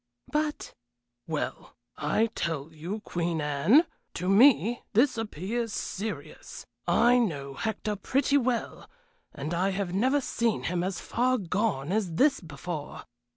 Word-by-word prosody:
"But 300 0 -1 0.3
" 120 0 -55
"Well, 155 -2 -4 0.2
I 215 +10 +1
tell 160 -2 -3
you, 175 +8 -5
Queen 170 -4 -2
Anne, 150 - +4 0.3
to 180 - -3
me 235 +2 +5
this 255 +5 +4
appears 225 +1 -3
serious. 210 +2 -5 0.2
I 240 +2 +5
know 145 - -2
Hector 215 +6 -2
pretty 275 +7 +2
well, 245 -2 -2 0.4
and 150 +3 -5
I 185 +3 +1
have 190 -2 -2
never 260 +9 +3
seen 235 -4 -1
him 175 0 -1
as 185 0 -2
far 255 +2 +1
gone 190 - -1
as 195 -5 0
this 280 - +4
before. 155 -1 -6
195 Hz, 135 wpm, -28 LUFS, 165-235 Hz, 0.4 s, me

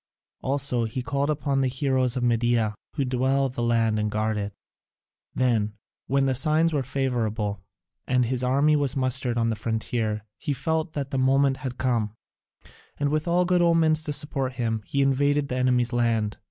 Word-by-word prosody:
Also 135 -3 +1
he 120 +3 -4
called 140 +2 -1
upon 140 -2 0
the 135 - +2
Heroes 130 -1 0
of 125 - -1
Media, 120 -2 +1 0.2
who 140 -3 0
dwell 130 +2 +1
in 135 - -2
the 125 - -5
land 115 -2 +1
and 105 0 0
guard 110 +1 -1
it. 105 0 -3 0.8
Then, 115 -5 +1 0.3
when 135 +1 +2
the 135 - +2
signs 155 +5 +2
were 145 - +1
favourable 115 -6 -2 0.5
and 125 -1 +2
his 125 +1 -1
army 140 +4 +3
was 145 -2 0
mustered 130 -2 +1
on 115 -1 +1
the 115 - -1
frontier, 110 -1 -2 0.2
he 145 - -2
felt 160 +3 -2
that 140 -2 -4
the 135 - -1
moment 135 +1 +3
had 130 -2 -6
come, 115 -4 -1 0.8
and 145 0 +1
with 155 +2 -1
all 175 +1 +2
good 180 0 +2
omens 165 -2 +3
to 150 - -1
support 140 -2 +1
him, 115 -3 -2
he 140 0 +1
invaded 140 +1 +1
the 125 - -2
enemy's 125 -1 +1
land. 115 -3 0
130 Hz, 180 wpm, -25 LUFS, 115-140 Hz, 0.8 s, army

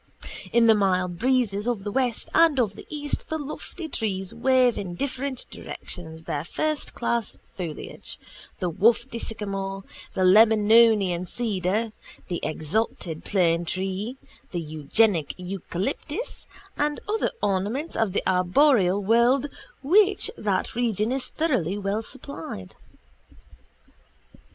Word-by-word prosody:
In 235 -1 +5
the 225 - +7
mild 185 -4 +1
breezes 240 -4 +1
of 235 -5 -1
the 205 - -3
west 250 -1 0
and 325 -4 +5
of 210 -5 +1
the - - -11
east 295 -1 -4
the 315 - -1
lofty 305 +3 -6
trees 200 -7 -2
wave 250 0 +3
in 180 -3 -5
different 265 +1 -3
directions 160 -2 -8
their 145 -2 -3
firstclass 235 - -2 0.2
foliage, 170 -5 -6 0.4
the 180 - 0
wafty 230 +5 +2
sycamore, 195 -3 -4 0.3
the 190 - +1
Lebanonian 210 -2 +5
cedar, 215 0 -1 0.4
the 175 - -2
exalted 160 0 -2
planetree, 185 +5 0 0.3
the 175 - -3
eugenic 155 +3 +1
eucalyptus 195 - -4 0.3
and 295 0 0
other 435 +1 +1
ornaments 205 - -1
of 220 -4 +1
the - - 0
arboreal 190 +2 +4
world 235 +5 +4 0.4
with 380 +8 +6
which 395 -1 -3
that 200 -3 -1
region 225 -2 0
is 265 0 -1
thoroughly 255 - 0
well 200 +2 -1
supplied. 220 - -7
215 Hz, 115 wpm, -25 LUFS, 185-255 Hz, 0.4 s, the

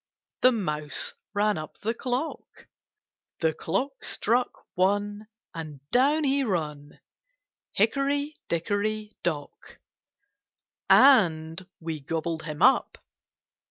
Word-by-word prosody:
The 255 - +7
mouse 150 - -2 0.2
ran 205 -3 +2
up 155 - -8
the 225 +2 -2
clock; 255 +5 -4 0.7
The 160 -2 +2
clock 255 - -3
struck 245 +3 0
one, 205 +3 0 0.3
And 150 -4 -8
down 285 +5 +4
he 275 0 +2
run. 150 - -3 0.7
Hickory, 280 +7 +1
dickory, 210 +5 -2
dock.' 155 -4 -5 1.1
And 180 - +5
we 160 -2 -4
gobbled 160 +3 -3
him 150 -1 -4
up. - - +4
205 Hz, 95 wpm, -27 LUFS, 160-250 Hz, 1.1 s, The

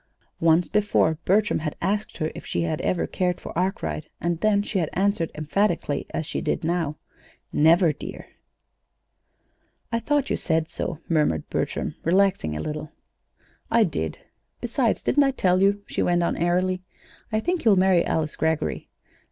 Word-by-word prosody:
Once 165 +1 +4
before 200 -7 +2
Bertram 210 +3 +3
had 155 -1 -3
asked 205 +2 -1
her 155 0 -1
if - - -9
she - - -2
had 160 -2 -2
ever 180 - 0
cared 180 -1 -1
for - - -9
Arkwright, 180 -4 -2
and 170 -1 -1
then 205 +1 +3
she 205 -1 -1
had 160 - 0
answered 195 -3 +1
emphatically, 155 -1 0
as 160 - -3
she - - -3
did - - -1
now: 165 -3 -1 0.6
"Never, 165 +1 +5
dear." - - -8 1.6
"I 230 - +1
thought 285 +2 0
you - - +1
said 160 0 0
so," 170 0 -4
murmured 150 - +1
Bertram, - - -2
relaxing 180 - +2
a 75 - -3
little. 155 0 -5 0.8
"I 230 - +5
did; 80 - -2 0.4
besides, 240 -1 0
didn't 290 - +4
I 275 - +3
tell 185 -8 +2
you?" 200 +1 +3
she - - -3
went 175 0 +2
on - - 0
airily, 180 +2 +1 0.5
"I 215 - +1
think 350 +8 -1
he'll 220 -4 +5
marry 185 -2 +4
Alice 155 -1 -1
Greggory. 160 -1 -1
175 Hz, 160 wpm, -24 LUFS, 160-200 Hz, 1.6 s, Never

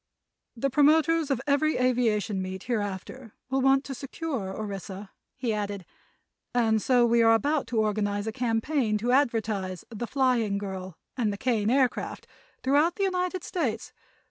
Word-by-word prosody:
"The 275 +4 0
promoters 310 +2 +4
of 270 -4 +1
every 295 +2 +2
aviation 230 -5 +1
meet, 185 0 -5
hereafter, 215 +1 -4 0.2
will 265 0 +1
want 270 +1 +4
to 275 - -6
secure 270 - -4
Orissa," 195 -1 -6 0.3
he 240 -3 -1
added, 205 -3 -3 0.7
"and 220 -3 +3
so 245 0 +4
we 235 0 +3
are 225 0 +6
about 290 +5 0
to 235 - -3
organize 205 -1 -1
a 220 - -2
campaign 235 -1 0
to 235 +4 -1
advertise 220 - 0
'The 235 +1 -4
Flying 245 -7 +1
Girl' 190 -3 -6 0.2
and 225 -5 0
the 200 - -5
Kane 225 -3 0
Aircraft 260 0 0 0.4
throughout 295 +6 +3
the 400 - -1
United 365 -1 -1
States. 250 -11 -3
235 Hz, 150 wpm, -27 LUFS, 205-275 Hz, 0.7 s, are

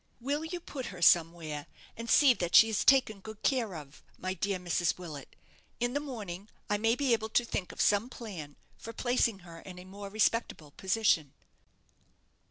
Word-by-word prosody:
Will 285 +5 -2
you 350 +2 -5
put 270 -6 -7
her 180 - -9
somewhere, 165 -3 +2 0.3
and 230 0 -7
see 280 -4 +6
that 175 -6 -2
she 225 - +8
is 220 - 0
taken 260 -6 +4
good 220 +1 -11
care 230 -8 0
of, 150 -2 -11 0.2
my 185 0 -3
dear 195 +2 -1
Mrs. 175 -1 0
Willet? 155 -7 -9 0.4
In 240 +1 0
the 285 - 0
morning 210 -9 -7 0.2
I 205 - +1
may 225 +2 +2
be 270 -2 +1
able 220 -1 -1
to 240 +2 +2
think 185 -5 -4
of - - -14
some 210 +4 +2
plan 180 - -8 0.2
for 230 - -8
placing 235 -4 0
her 165 -1 -11
in 180 +1 -11
a 180 - -10
more 200 +1 -9
respectable 215 -7 0
position." 190 -6 +1
205 Hz, 180 wpm, -30 LUFS, 175-235 Hz, 0.4 s, she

